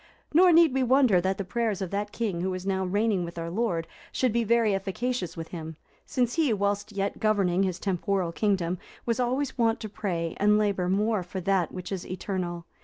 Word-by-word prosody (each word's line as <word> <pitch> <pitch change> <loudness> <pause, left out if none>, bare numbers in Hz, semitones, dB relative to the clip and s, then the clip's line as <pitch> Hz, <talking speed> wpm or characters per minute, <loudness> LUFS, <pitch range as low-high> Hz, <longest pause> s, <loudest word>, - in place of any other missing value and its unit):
Nor 355 +3 +7
need 330 -4 +6
we 265 - +1
wonder 255 -7 +4
that 190 +1 0
the 195 - -2
prayers 220 0 -1
of 190 -3 -4
that 205 +1 -2
king 205 -7 -2
who 185 0 -1
is 185 0 -6
now 190 -1 0
reigning 205 0 +1
with 170 0 -7
our 165 0 -4
Lord, 180 -5 -1 0.3
should 255 -4 +1
be 235 0 +2
very 225 -1 +3
efficacious 195 -1 -2
with 165 0 -6
Him, 160 -2 -7 0.3
since 245 -4 0
he, 320 -6 +2
whilst 205 +1 -1
yet 200 0 -2
governing 195 -4 +2
his 185 -2 0
temporal 190 -1 -1
kingdom, 185 -2 0 0.3
was 235 +1 0
always 260 +2 -1
wont 230 0 +2
to 215 - -5
pray 175 -6 -3
and 210 +1 +4
labour 200 -4 +1
more 210 +2 +1
for 180 +2 -6
that 185 -2 +1
which 180 0 -7
is 190 -2 -4
eternal. 180 -2 -4
200 Hz, 205 wpm, -27 LUFS, 180-230 Hz, 0.3 s, Nor